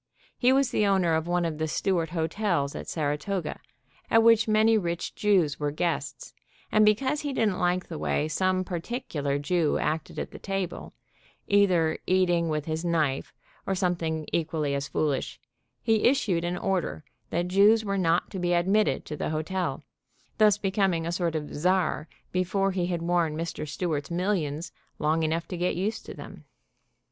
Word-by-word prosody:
He 250 Hz, 0 st, +3 dB
was 270 Hz, -1 st, +3 dB
the 210 Hz, -, +2 dB
owner 190 Hz, -4 st, +3 dB
of 160 Hz, +1 st, 0 dB
one 175 Hz, 0 st, +1 dB
of 160 Hz, -2 st, -3 dB
the 160 Hz, -, 0 dB
Stew 190 Hz, +4 st, 0 dB
art 165 Hz, -1 st, -2 dB
hotels 165 Hz, -2 st, -1 dB
at -, -, -7 dB
Saratoga, 155 Hz, +3 st, -2 dB, 0.5 s
at 225 Hz, -1 st, +5 dB
which 225 Hz, -1 st, +5 dB
many 220 Hz, +1 st, +4 dB
rich 170 Hz, -5 st, -2 dB
Jews 185 Hz, -8 st, +2 dB
were 145 Hz, -1 st, 0 dB
guests, 170 Hz, +3 st, -3 dB, 0.4 s
and 215 Hz, -, +5 dB
because 260 Hz, +8 st, +2 dB
he 290 Hz, -, -3 dB
didn't 210 Hz, -7 st, +1 dB
like 180 Hz, +1 st, 0 dB
the -, -, -6 dB
way 75 Hz, -, 0 dB
some 185 Hz, +4 st, +1 dB
par 180 Hz, -2 st, -4 dB
ticular 160 Hz, -, -3 dB
Jew 160 Hz, +1 st, +1 dB
acted 155 Hz, 0 st, -2 dB
at -, -, -4 dB
the -, -, -10 dB
table, 195 Hz, -2 st, -4 dB, 0.5 s
either 180 Hz, -6 st, +3 dB
eating 175 Hz, -3 st, +2 dB
with 150 Hz, -1 st, -1 dB
his 160 Hz, +1 st, -3 dB
knife, 155 Hz, -6 st, 0 dB, 0.4 s
or 195 Hz, -, +1 dB
something 170 Hz, -4 st, -1 dB
equally 155 Hz, -3 st, 0 dB
as 140 Hz, 0 st, -2 dB
foolish, 145 Hz, -4 st, -1 dB, 0.4 s
he 220 Hz, -2 st, +2 dB
issued 210 Hz, -10 st, +2 dB
an 175 Hz, +1 st, -2 dB
order 180 Hz, -, -2 dB, 0.3 s
that 175 Hz, +1 st, -1 dB
Jews 210 Hz, +4 st, +5 dB
were 200 Hz, -, -1 dB
not 170 Hz, -1 st, +1 dB
to 190 Hz, -, -5 dB
be 175 Hz, 0 st, +1 dB
admitted 195 Hz, +5 st, +2 dB
to 150 Hz, -, -5 dB
the -, -, -3 dB
hotel, 160 Hz, +4 st, -2 dB, 0.6 s
thus 210 Hz, -1 st, +5 dB
becoming 190 Hz, -4 st, 0 dB
a 170 Hz, -, -2 dB
sort 170 Hz, -2 st, -1 dB
of 150 Hz, -1 st, -4 dB
Czar 180 Hz, 0 st, +1 dB, 0.2 s
before 195 Hz, +2 st, +1 dB
he 180 Hz, -2 st, -1 dB
had 170 Hz, -2 st, -2 dB
worn 170 Hz, -3 st, +1 dB
Mr. 165 Hz, -2 st, -4 dB
Stewart's 150 Hz, -1 st, -2 dB
millions 170 Hz, -4 st, -1 dB, 0.3 s
long 155 Hz, +2 st, +1 dB
enough 160 Hz, +1 st, -1 dB
to 180 Hz, -, -4 dB
get 175 Hz, +1 st, 0 dB
used 205 Hz, +5 st, -3 dB
to -, -, -7 dB
them. -, -, -11 dB
175 Hz, 175 wpm, -27 LUFS, 160-195 Hz, 0.6 s, at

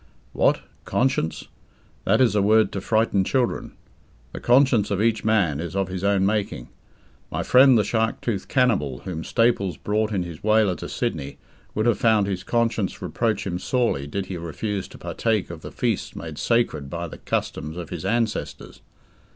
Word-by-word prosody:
What? -, -, +2 dB, 0.2 s
Conscience? 120 Hz, -10 st, 0 dB, 0.6 s
That 110 Hz, +5 st, +3 dB
is 120 Hz, -5 st, +4 dB
a 105 Hz, -, +2 dB
word 110 Hz, +2 st, +4 dB
to 100 Hz, -, -4 dB
frighten 110 Hz, -2 st, +2 dB
children. 125 Hz, +4 st, -1 dB, 0.6 s
The -, -, -5 dB
conscience 125 Hz, -4 st, +4 dB
of 100 Hz, -2 st, -1 dB
each 110 Hz, +1 st, +1 dB
man 100 Hz, -10 st, +2 dB
is 85 Hz, +1 st, -5 dB
of 95 Hz, -1 st, 0 dB
his 90 Hz, 0 st, -5 dB
own 100 Hz, -1 st, +3 dB
making. 100 Hz, -, -1 dB, 0.6 s
My -, -, -2 dB
friend 130 Hz, -1 st, +6 dB
the 105 Hz, -, +3 dB
shark 110 Hz, +2 st, 0 dB
toothed 100 Hz, -6 st, -3 dB
cannibal 100 Hz, -, +1 dB
whom 85 Hz, -4 st, -4 dB
Staples 100 Hz, -8 st, +1 dB
brought 105 Hz, +1 st, -1 dB
in 95 Hz, -4 st, 0 dB
his 85 Hz, -3 st, -9 dB
whaler 110 Hz, -2 st, +3 dB
to -, -, -7 dB
Sydney 70 Hz, 0 st, -3 dB, 0.4 s
would 110 Hz, -, 0 dB
have 120 Hz, -3 st, +2 dB
found 110 Hz, -3 st, +4 dB
his 95 Hz, -2 st, -3 dB
conscience 115 Hz, -4 st, 0 dB
reproach 110 Hz, -3 st, -1 dB
him 90 Hz, -2 st, -2 dB
sorely 115 Hz, -, 0 dB
did 95 Hz, +6 st, -3 dB
he 95 Hz, -1 st, -5 dB
refuse 95 Hz, +4 st, -4 dB
to -, -, -13 dB
partake 110 Hz, -6 st, -1 dB
of 85 Hz, -2 st, -9 dB
the -, -, -8 dB
feasts -, -, -2 dB
made 80 Hz, -2 st, -7 dB
sacred 100 Hz, -, 0 dB
by 85 Hz, +3 st, -4 dB
the -, -, -10 dB
customs 75 Hz, +3 st, -3 dB
of 85 Hz, -2 st, -7 dB
his 85 Hz, -2 st, -5 dB
ancestors. 110 Hz, +2 st, -2 dB
100 Hz, 175 wpm, -24 LUFS, 90-115 Hz, 0.6 s, friend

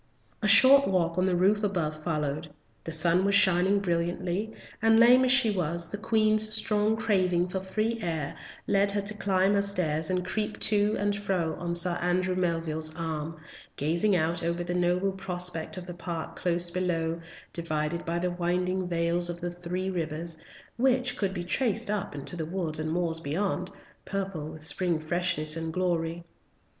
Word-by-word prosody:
A -, -, +1 dB
short 275 Hz, +1 st, +8 dB
walk 175 Hz, -2 st, 0 dB
on 185 Hz, -, +2 dB
the 185 Hz, -, +1 dB
roof 200 Hz, +4 st, +2 dB
above 160 Hz, -7 st, -2 dB
followed. 150 Hz, -1 st, -2 dB, 0.4 s
The 165 Hz, -, -4 dB
sun 170 Hz, +3 st, +2 dB
was 200 Hz, 0 st, +2 dB
shining 190 Hz, 0 st, +4 dB
brilliantly, 175 Hz, +3 st, -2 dB, 0.3 s
and 225 Hz, 0 st, +4 dB
lame 245 Hz, +2 st, +7 dB
as 255 Hz, -, +3 dB
she 255 Hz, -4 st, +5 dB
was, 170 Hz, -3 st, -1 dB
the 205 Hz, -, -6 dB
Queen's 215 Hz, 0 st, +2 dB
strong 215 Hz, 0 st, +1 dB
craving 185 Hz, -5 st, +1 dB
for 190 Hz, -, -3 dB
free 215 Hz, +5 st, -2 dB
air 160 Hz, -6 st, -3 dB, 0.3 s
led 200 Hz, 0 st, +2 dB
her 205 Hz, -, 0 dB
to 200 Hz, +2 st, -4 dB
climb 195 Hz, -1 st, +1 dB
her 200 Hz, -, +3 dB
stairs 160 Hz, -6 st, -1 dB
and 180 Hz, -1 st, -1 dB
creep 210 Hz, +3 st, -3 dB
to 210 Hz, 0 st, +2 dB
and 205 Hz, 0 st, 0 dB
fro 190 Hz, -6 st, -1 dB
on 170 Hz, 0 st, -3 dB
Sir 175 Hz, 0 st, +6 dB
Andrew 180 Hz, +1 st, 0 dB
Melville's 165 Hz, -3 st, -1 dB
arm, 160 Hz, -1 st, -4 dB, 0.4 s
gazing 170 Hz, +7 st, +1 dB
out 165 Hz, 0 st, +1 dB
over 170 Hz, +1 st, -2 dB
the 175 Hz, 0 st, -3 dB
noble 180 Hz, +2 st, +1 dB
prospect 180 Hz, -3 st, 0 dB
of 180 Hz, -, -7 dB
the 175 Hz, -, -7 dB
park 170 Hz, -1 st, -6 dB
close 175 Hz, -1 st, -1 dB
below, 170 Hz, -2 st, -2 dB, 0.3 s
divided 160 Hz, 0 st, -2 dB
by 170 Hz, +1 st, -2 dB
the 180 Hz, +1 st, -1 dB
winding 180 Hz, +1 st, -1 dB
vales 170 Hz, 0 st, +1 dB
of 175 Hz, 0 st, -5 dB
the 175 Hz, 0 st, -4 dB
three 180 Hz, +2 st, -4 dB
rivers, 165 Hz, -1 st, -3 dB, 0.4 s
which 250 Hz, 0 st, +1 dB
could 195 Hz, -5 st, -1 dB
be 175 Hz, -2 st, -4 dB
traced 225 Hz, +2 st, -1 dB
up 205 Hz, -6 st, -3 dB
into 140 Hz, +4 st, -4 dB
the 160 Hz, -2 st, -4 dB
woods 165 Hz, -3 st, -3 dB
and 155 Hz, 0 st, -3 dB
the -, -, -2 dB
moors 170 Hz, -2 st, +1 dB
beyond, 180 Hz, +4 st, -2 dB, 0.4 s
purple 195 Hz, -6 st, -4 dB
with 155 Hz, 0 st, -9 dB
spring 170 Hz, 0 st, +1 dB
freshness 155 Hz, -1 st, -1 dB
and 165 Hz, 0 st, -4 dB
glory. 170 Hz, -1 st, -2 dB
180 Hz, 175 wpm, -27 LUFS, 165-200 Hz, 0.4 s, short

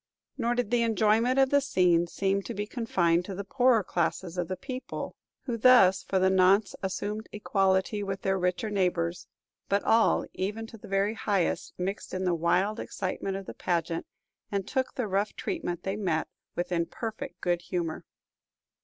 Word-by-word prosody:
Nor 240 Hz, -2 st, 0 dB
did 240 Hz, -3 st, -1 dB
the 240 Hz, -1 st, +3 dB
enjoyment 225 Hz, +3 st, +3 dB
of 270 Hz, -1 st, +4 dB
the 285 Hz, 0 st, +5 dB
scene 175 Hz, -9 st, +3 dB
seem 195 Hz, +3 st, 0 dB
to -, -, -6 dB
be 205 Hz, +1 st, -2 dB
confined 180 Hz, -8 st, +1 dB
to 195 Hz, -, -6 dB
the 200 Hz, -, -4 dB
poorer 245 Hz, +1 st, +3 dB
classes 175 Hz, 0 st, -1 dB
of 175 Hz, -2 st, -1 dB
the 185 Hz, -, -4 dB
people, 255 Hz, +5 st, -6 dB, 0.3 s
who 240 Hz, -3 st, -3 dB
thus 215 Hz, -6 st, +6 dB
for 195 Hz, -, -1 dB
the 185 Hz, 0 st, +4 dB
nonce 190 Hz, +2 st, +4 dB
assumed 205 Hz, +3 st, -3 dB
equality 195 Hz, 0 st, +1 dB
with 195 Hz, -1 st, -4 dB
their 190 Hz, 0 st, +1 dB
richer 180 Hz, +4 st, -1 dB
neighbors; 180 Hz, -3 st, 0 dB, 0.4 s
but 200 Hz, 0 st, +2 dB
all, 225 Hz, 0 st, +3 dB
even 210 Hz, +4 st, -3 dB
to 225 Hz, -, -11 dB
the -, -, -11 dB
very 195 Hz, +2 st, +1 dB
highest, 200 Hz, -4 st, -1 dB
mixed 190 Hz, +2 st, -4 dB
in 185 Hz, -, -2 dB
the 180 Hz, -1 st, +2 dB
wild 180 Hz, +6 st, +1 dB
excitement 190 Hz, 0 st, -3 dB
of 195 Hz, -, -7 dB
the -, -, -7 dB
pageant, 170 Hz, -1 st, -2 dB, 0.4 s
and 200 Hz, -2 st, -2 dB
took 260 Hz, -1 st, -1 dB
the 250 Hz, -4 st, -1 dB
rough 200 Hz, +2 st, 0 dB
treatment 180 Hz, -, -3 dB
they 195 Hz, +1 st, -2 dB
met 175 Hz, -6 st, 0 dB, 0.3 s
with 175 Hz, +1 st, -2 dB
in 170 Hz, -1 st, +1 dB
perfect 220 Hz, -5 st, -6 dB
good 175 Hz, -1 st, 0 dB
humor. 170 Hz, -3 st, -3 dB
195 Hz, 180 wpm, -28 LUFS, 180-220 Hz, 0.4 s, thus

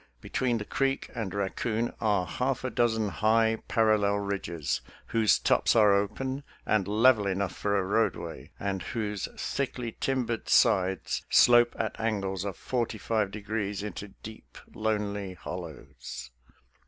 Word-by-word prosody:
Between 120 Hz, -, -1 dB
the 105 Hz, -, -5 dB
creek 135 Hz, +3 st, -1 dB
and 115 Hz, -6 st, -3 dB
Raccoon 110 Hz, +4 st, -1 dB
are 105 Hz, -5 st, +2 dB
half 130 Hz, +9 st, -2 dB
a 130 Hz, -, -2 dB
dozen 110 Hz, -3 st, +1 dB
high, 110 Hz, +2 st, +2 dB
parallel 110 Hz, -3 st, +3 dB
ridges, 95 Hz, -9 st, -2 dB, 0.3 s
who^e 110 Hz, -2 st, +3 dB
tops -, -, +3 dB
are 105 Hz, -3 st, +6 dB
open 130 Hz, +8 st, -1 dB, 0.2 s
and 105 Hz, -3 st, +1 dB
level 110 Hz, 0 st, +4 dB
enough 95 Hz, -1 st, -1 dB
for 100 Hz, -1 st, 0 dB
a 100 Hz, -, +1 dB
roadway, 105 Hz, +4 st, -1 dB
and 100 Hz, -1 st, -2 dB
whose 105 Hz, -4 st, -3 dB
thickly 125 Hz, -4 st, -3 dB
timbered 125 Hz, -4 st, -1 dB
sides 95 Hz, 0 st, +3 dB
slope 120 Hz, 0 st, +6 dB
at 110 Hz, -2 st, -3 dB
angles 100 Hz, -4 st, -1 dB
of 100 Hz, -3 st, -4 dB
forty 120 Hz, -3 st, -2 dB
five 110 Hz, -1 st, 0 dB
de 105 Hz, +2 st, -7 dB
grees 105 Hz, -1 st, -3 dB
into 105 Hz, 0 st, -6 dB, 0.2 s
deep, 110 Hz, 0 st, -11 dB, 0.2 s
lonely 105 Hz, -3 st, -2 dB
hollows. 70 Hz, -9 st, -8 dB
105 Hz, 140 wpm, -28 LUFS, 100-115 Hz, 0.3 s, are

